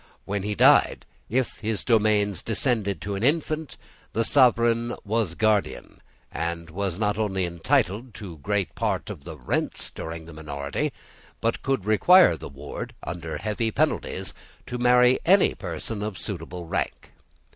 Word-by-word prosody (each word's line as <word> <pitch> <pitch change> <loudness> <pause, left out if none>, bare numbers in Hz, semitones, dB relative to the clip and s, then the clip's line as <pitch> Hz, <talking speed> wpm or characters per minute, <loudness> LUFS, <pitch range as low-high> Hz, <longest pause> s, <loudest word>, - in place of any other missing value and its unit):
When 100 0 -2
he 105 +1 -2
died, - - +5 0.2
if 130 +2 -1
his 110 -2 -2
domains 105 -5 +2
descended 110 -3 -1
to 100 - -3
an 100 - -3
infant, 155 +2 0 0.4
the 115 - +1
sovereign 120 -2 +3
was 105 -5 0
guardian, 110 -1 0 0.3
and 85 0 -4
was 95 0 -2
not 105 0 0
only 95 -4 0
entitled 90 +7 0
to 90 -7 -8
great 100 +4 -1
part - - -2
of 70 - -10
the 80 -3 -8
rents 60 - -2
during 80 0 -7
the 85 - -11
minority, 70 -2 -3 0.5
but 115 +1 -1
could 135 -8 -1
require 110 - +6
the - - -9
ward, 70 +1 -7
under 85 -2 -5
heavy 110 +2 -1
penalties, - - -1 0.3
to 125 - -5
marry 125 +1 +5
any 190 +3 +5
person 95 +3 -5
of 105 -3 -4
suitable 85 -1 -6
rank. 80 - -3
105 Hz, 145 wpm, -25 LUFS, 85-115 Hz, 0.5 s, require